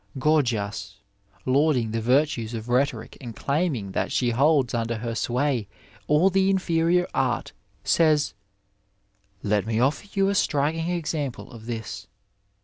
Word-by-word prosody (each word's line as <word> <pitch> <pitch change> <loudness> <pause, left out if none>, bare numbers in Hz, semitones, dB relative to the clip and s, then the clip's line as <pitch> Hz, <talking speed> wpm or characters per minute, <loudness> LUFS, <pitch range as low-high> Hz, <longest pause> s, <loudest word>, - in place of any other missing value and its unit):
Gorgias, 115 -9 0 0.5
lauding 130 -4 +2
the 115 0 -1
virtues 125 -2 +1
of 115 +1 -6
rhetoric 125 -2 0
and 120 -4 -7
claiming 140 - -1
that - - -1
she 120 -2 +1
holds 140 +1 +3
under 115 -1 -1
her 115 +1 -4
sway 125 -1 0 0.4
all 155 +6 +4
the 190 +1 +3
inferior 180 -2 +2
art, 125 -3 -1 0.3
says: 155 -6 +3 0.6
" 100 0 -43
Let 105 0 +1
me 110 0 0
offer 140 - +1
you 195 -1 +2
a - - +1
striking 160 -1 +1
ex 170 -3 -2
ample 140 -6 -4
of 115 -2 -11
this. 110 -4 -5
130 Hz, 140 wpm, -25 LUFS, 115-155 Hz, 0.6 s, all